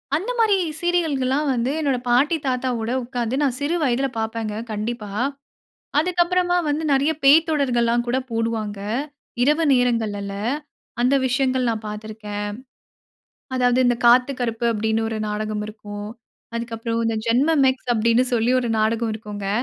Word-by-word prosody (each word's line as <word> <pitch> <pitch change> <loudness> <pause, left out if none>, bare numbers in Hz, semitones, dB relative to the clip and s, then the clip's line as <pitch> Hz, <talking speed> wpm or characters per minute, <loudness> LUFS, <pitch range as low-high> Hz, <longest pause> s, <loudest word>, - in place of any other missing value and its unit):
அந்த 380 +11 -2
மாரி 435 -3 +4 0.2
சீரியல்கள்லாம் 300 -5 0
வந்து 245 +2 0
என்னுடைய 275 -5 0
பாட்டி 275 +7 +3
தாத்தா 255 0 0
கூட 225 +1 -2
உட்கார்ந்து 240 -1 -2
நான் 265 -4 +1
சிறு 290 +4 0
வயதில 265 0 +1
பார்ப்பேங்க 220 -1 -3 0.2
கண்டிப்பா. 215 0 -4 0.9
அதுக்கு 350 +3 +1
அப்புறமா 355 0 +1
வந்து 295 +2 0
நெறைய 280 +3 +3
பேய்த் 315 +4 +6
தொடர்கள்லாம் 240 -5 +1
கூட 240 +2 0
போடுவாங்க. 225 -3 -2 0.6
இரவு 300 +5 +3
நேரங்கள்லல 220 -5 0 0.7
அந்த 250 +3 +3
விஷயங்கள் 260 0 +1
நான் 220 -1 -4
பார்த்து 210 +1 -6
இருக்கேன். 210 -1 -5 1.1
அதாவது 250 -1 +2
இந்த 245 -1 +3
"காத்து 250 +3 +5
கருப்பு" 235 -1 -2
அப்டின்னு 220 +1 0
1 220 - -3
நாடகம் 210 0 -3
இருக்கும். 205 -1 -8 0.5
அதுக்கப்பறம் 230 0 -3
இந்த 225 -1 0
"ஜென்மம் 275 +6 +3
மேக்ஸ்" 260 -1 0
அப்டின்னு 230 +2 +3
சொல்லி 230 +1 +2
1 245 - -2
நாடகம் 225 +1 +1
இருக்கும்ங்க. 205 -2 -6
240 Hz, 140 wpm, -22 LUFS, 220-275 Hz, 1.1 s, பேய்த்